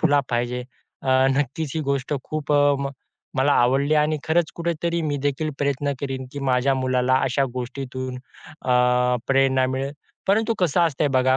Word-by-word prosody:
ठेवला 145 Hz, -3 st, +4 dB
पाहिजे. 120 Hz, +1 st, -1 dB, 0.4 s
नक्कीच, 135 Hz, +3 st, +1 dB
ही 160 Hz, -, 0 dB
गोष्ट 140 Hz, +1 st, -1 dB
खूप 155 Hz, -1 st, -3 dB
अ, 145 Hz, 0 st, +4 dB
म 140 Hz, -, -2 dB, 0.5 s
मला 140 Hz, +2 st, +3 dB
आवडली 135 Hz, +5 st, +3 dB
आणि 150 Hz, +1 st, +2 dB
खरंच 160 Hz, 0 st, +1 dB
कुठेतरी 170 Hz, 0 st, -1 dB
मी 145 Hz, -2 st, -1 dB
देखील 145 Hz, +2 st, -1 dB
प्रयत्न 140 Hz, 0 st, 0 dB
करीन, 135 Hz, -2 st, -4 dB
की 145 Hz, -, -6 dB
माझ्या 135 Hz, 0 st, +2 dB
मुलाला 130 Hz, 0 st, +1 dB
अशा 135 Hz, +1 st, +1 dB
गोष्टीतून 130 Hz, 0 st, -5 dB
अ, 125 Hz, -2 st, 0 dB
प्रेरणा 135 Hz, -1 st, +3 dB
मिळेल. 135 Hz, +2 st, -2 dB, 0.3 s
परंतु 220 Hz, +3 st, +2 dB
कसं 175 Hz, -2 st, +2 dB
असतंय 155 Hz, -3 st, +2 dB
बघा, 130 Hz, 0 st, +4 dB
135 Hz, 155 wpm, -23 LUFS, 130-150 Hz, 0.5 s, ठेवला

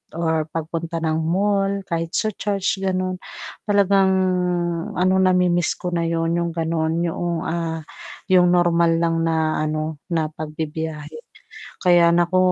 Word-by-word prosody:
or 160 Hz, -2 st, 0 dB
pagpunta 165 Hz, +1 st, -4 dB
ng 160 Hz, 0 st, 0 dB
mall 195 Hz, +4 st, 0 dB
kahit 165 Hz, -2 st, -3 dB
sa 215 Hz, -1 st, +1 dB
church, 195 Hz, -1 st, -2 dB
ganun, 185 Hz, -1 st, -1 dB, 0.5 s
talagang, 200 Hz, -1 st, +4 dB, 0.9 s
ano, 185 Hz, +1 st, +2 dB
namimiss 180 Hz, -2 st, +2 dB
ko 180 Hz, -, -5 dB
na 170 Hz, -1 st, 0 dB
yun 165 Hz, 0 st, 0 dB
yung 170 Hz, -1 st, -1 dB
ganon 165 Hz, 0 st, 0 dB
yoong, 170 Hz, 0 st, -2 dB
ah, 165 Hz, -2 st, -3 dB, 0.5 s
yung 180 Hz, -1 st, +6 dB
normal 170 Hz, -1 st, +3 dB, 0.2 s
lang 165 Hz, 0 st, +1 dB
na, 160 Hz, -1 st, 0 dB
ano, 155 Hz, 0 st, -2 dB
na 160 Hz, -3 st, -1 dB
pagbibiyahe. 155 Hz, 0 st, -5 dB, 0.7 s
Kaya 175 Hz, -1 st, +5 dB
naku, 175 Hz, +2 st, +2 dB
170 Hz, 130 wpm, -21 LUFS, 160-185 Hz, 0.9 s, yung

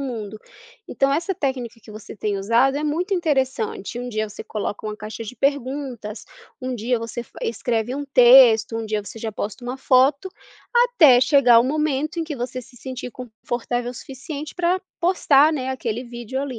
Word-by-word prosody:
mundo. 220 Hz, -6 st, -5 dB, 0.5 s
Então 275 Hz, 0 st, +1 dB
essa 335 Hz, +6 st, 0 dB
técnica 260 Hz, -7 st, -3 dB
que 215 Hz, -, -14 dB
você 215 Hz, 0 st, -10 dB
tem 205 Hz, -1 st, -2 dB
usado 235 Hz, +7 st, +2 dB
é 295 Hz, -, -2 dB
muito 350 Hz, +7 st, -1 dB
interessante, 265 Hz, -, -1 dB
um 245 Hz, 0 st, -5 dB
dia 215 Hz, -2 st, -2 dB
você -, -, -9 dB
coloca 210 Hz, 0 st, -5 dB
uma 210 Hz, 0 st, -4 dB
caixa 215 Hz, +2 st, -7 dB
de 225 Hz, +3 st, -8 dB
perguntas, 260 Hz, -5 st, -2 dB, 0.4 s
um 255 Hz, 0 st, -3 dB
dia 240 Hz, +2 st, -1 dB
você 230 Hz, +1 st, -5 dB
fa -, -, -16 dB
escreve 235 Hz, +1 st, -1 dB
um 285 Hz, 0 st, -4 dB
texto, 245 Hz, -4 st, +6 dB
um 225 Hz, -, -3 dB
dia 215 Hz, -1 st, -2 dB
você 225 Hz, -, -10 dB
já 225 Hz, -, -3 dB
posta 210 Hz, +4 st, -5 dB
uma 250 Hz, +2 st, -4 dB
foto, 270 Hz, +7 st, +3 dB, 0.5 s
até 430 Hz, -, +6 dB
chegar 255 Hz, -3 st, +6 dB
o -, -, +1 dB
momento 305 Hz, +2 st, -1 dB
em 330 Hz, -, -1 dB
que 310 Hz, -2 st, -5 dB
você 255 Hz, +1 st, -4 dB
se 245 Hz, +1 st, -17 dB
sentir 255 Hz, 0 st, -7 dB
confortável 245 Hz, 0 st, -4 dB
o -, -, -10 dB
suficiente 280 Hz, +4 st, -8 dB
pra 360 Hz, +1 st, +1 dB, 0.2 s
postar, 315 Hz, -4 st, +4 dB
né, 260 Hz, -3 st, -3 dB
aquele 245 Hz, -2 st, -3 dB
vídeo 240 Hz, +2 st, -6 dB
ali, 260 Hz, -5 st, -5 dB
255 Hz, 185 wpm, -22 LUFS, 230-280 Hz, 0.5 s, texto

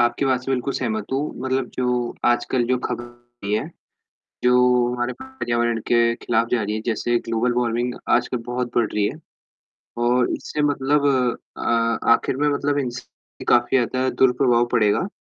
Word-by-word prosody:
आपकी 120 Hz, +3 st, +2 dB
बात 130 Hz, -2 st, +2 dB
से 135 Hz, -, -4 dB
बिल्कुल 130 Hz, +1 st, -1 dB
सहमत 110 Hz, -4 st, -2 dB
हूँ, 140 Hz, +3 st, -2 dB
मतलब 130 Hz, 0 st, 0 dB
जो 125 Hz, -1 st, -1 dB
आजकल 120 Hz, +1 st, +2 dB
जो 130 Hz, +1 st, +2 dB
ख़बर 120 Hz, -, -3 dB
होती 120 Hz, -3 st, -9 dB
है, 125 Hz, +8 st, -1 dB, 0.8 s
जो 125 Hz, 0 st, +4 dB
हमारे 120 Hz, 0 st, -2 dB
पर्यावरण 120 Hz, -, -1 dB
के 115 Hz, -1 st, +3 dB
खिलाफ़ 115 Hz, -1 st, 0 dB
जा 120 Hz, -, +2 dB
रही 105 Hz, +1 st, -2 dB
है, 110 Hz, -, -3 dB
जैसे 120 Hz, +1 st, 0 dB
ग्लोबल 115 Hz, +2 st, +1 dB
वार्मिंग 120 Hz, 0 st, 0 dB, 0.2 s
आजकल 125 Hz, +1 st, +2 dB
बहुत 125 Hz, 0 st, -3 dB
बढ़ 120 Hz, -2 st, +3 dB
रही 105 Hz, -1 st, +1 dB
है 155 Hz, -, -7 dB, 0.9 s
और 125 Hz, 0 st, +2 dB
इससे 150 Hz, -, -4 dB
मतलब 145 Hz, 0 st, +1 dB, 0.5 s
अ, -, -, -6 dB, 0.5 s
आख़िर 115 Hz, -, +2 dB
में 145 Hz, +1 st, +1 dB
मतलब 145 Hz, 0 st, 0 dB
इनसे 125 Hz, -2 st, -8 dB
काफ़ी 120 Hz, +2 st, +4 dB
ज़्यादा 130 Hz, +1 st, 0 dB
दुर-प्रभाव 125 Hz, -2 st, +3 dB
पड़ेगा, 115 Hz, -, +2 dB
125 Hz, 160 wpm, -22 LUFS, 120-130 Hz, 0.9 s, जो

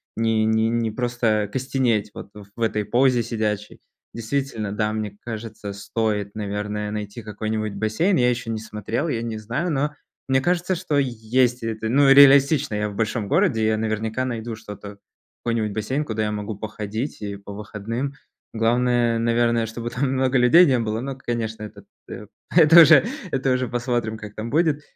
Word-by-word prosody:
не 110 Hz, -1 st, +1 dB
не 110 Hz, 0 st, +2 dB
не 115 Hz, -1 st, 0 dB
просто 115 Hz, -3 st, 0 dB
костенеть 125 Hz, -5 st, 0 dB
вот -, -, -9 dB, 0.3 s
в 115 Hz, -, -9 dB
этой 105 Hz, -2 st, 0 dB
позе 125 Hz, +2 st, +3 dB
сидячей. 105 Hz, -2 st, -3 dB, 0.3 s
Действительно, 115 Hz, -3 st, -3 dB
да, 105 Hz, 0 st, -1 dB
мне 105 Hz, -2 st, -4 dB
кажется, 110 Hz, -3 st, -6 dB
стоит, 105 Hz, 0 st, -2 dB
наверное, 105 Hz, 0 st, -3 dB
найти 105 Hz, +1 st, -5 dB
какой-нибудь 110 Hz, 0 st, -3 dB
бассейн. 110 Hz, -, +1 dB
Я 125 Hz, -1 st, +3 dB
еще 120 Hz, -1 st, -4 dB
не 110 Hz, -1 st, -2 dB
смотрел, 110 Hz, -, -4 dB
я 115 Hz, -6 st, -2 dB
не 115 Hz, -2 st, -4 dB
знаю, 125 Hz, +11 st, -3 dB
но 150 Hz, +1 st, 0 dB, 0.3 s
мне 130 Hz, 0 st, +2 dB
кажется, 180 Hz, +4 st, 0 dB
что 165 Hz, -5 st, -1 dB
есть 125 Hz, -1 st, +1 dB
это, 110 Hz, -1 st, -3 dB
ну, 140 Hz, +3 st, +4 dB
реалистично. 140 Hz, -1 st, +6 dB
Я 105 Hz, 0 st, -1 dB
в 100 Hz, -, -9 dB
большом 110 Hz, -1 st, -1 dB
городе, 150 Hz, -, +2 dB
я 110 Hz, 0 st, +1 dB
наверняка 110 Hz, +3 st, -2 dB
найду 115 Hz, -2 st, -4 dB
что-то, 105 Hz, -2 st, -10 dB, 0.5 s
какой-нибудь 110 Hz, -3 st, -1 dB
бассейн, 130 Hz, +7 st, -2 dB
куда 110 Hz, -3 st, -2 dB
я 105 Hz, -, -1 dB
могу 105 Hz, +1 st, -4 dB
походить 110 Hz, +4 st, -5 dB
и 100 Hz, -1 st, -4 dB
по 100 Hz, +1 st, -10 dB
выходным. 110 Hz, +6 st, -5 dB, 0.4 s
Главное, 120 Hz, +1 st, +1 dB
наверное, 115 Hz, 0 st, +1 dB
чтобы 115 Hz, +1 st, -6 dB
там 130 Hz, +1 st, -1 dB
много 130 Hz, 0 st, +1 dB
людей 130 Hz, +9 st, +7 dB
не 130 Hz, -5 st, +2 dB
было, 110 Hz, 0 st, -2 dB
но, 135 Hz, +1 st, -4 dB
конечно, 115 Hz, -4 st, -4 dB
это 105 Hz, -, -10 dB, 0.2 s
т -, -, -9 dB, 0.3 s
это 165 Hz, 0 st, +9 dB
уже 155 Hz, +1 st, +7 dB, 0.3 s
это 135 Hz, 0 st, 0 dB
уже 130 Hz, 0 st, 0 dB
посмотрим, 120 Hz, -2 st, -2 dB
как 105 Hz, -1 st, -10 dB
там 110 Hz, +2 st, -5 dB
будет. 155 Hz, 0 st, +1 dB
115 Hz, 170 wpm, -23 LUFS, 110-130 Hz, 0.5 s, это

